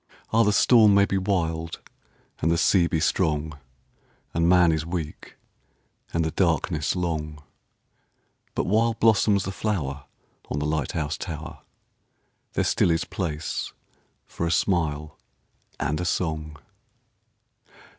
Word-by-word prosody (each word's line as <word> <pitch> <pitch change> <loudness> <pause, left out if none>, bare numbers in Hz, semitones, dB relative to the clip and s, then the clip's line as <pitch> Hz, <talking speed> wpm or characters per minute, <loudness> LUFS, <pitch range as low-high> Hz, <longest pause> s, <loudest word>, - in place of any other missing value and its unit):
Ah, 115 - +5
the 105 -2 +4
storm 110 -1 +6
may 100 0 +5
be 95 -1 0
wild 85 -4 -2 0.6
and 80 - +1
the 85 - +2
sea 85 +1 +4
be 80 - 0
strong, 75 -2 0 0.7
And 85 +1 +2
man 90 -2 +5
is 80 -1 -1
weak 80 -2 -6 0.8
and 85 -1 0
the 80 - -1
darkness 80 -3 0
long, 75 -4 -3 1.1
But - - 0
while 115 +4 +2
blossoms 105 -3 +3
the 95 - -4
flower 75 -10 -3 0.4
on - - -2
the 75 - -1
light 75 -3 -1
house 75 -1 -2
tower 80 -3 -6 0.9
There - - +1
still - - +2
is 80 -1 +1
place 80 -4 -4 0.5
for 85 - -3
a - - 0
smile 80 -4 0 0.6
and 75 +3 -1
a - - -2
song. 80 -3 -2
85 Hz, 130 wpm, -25 LUFS, 75-95 Hz, 1.1 s, storm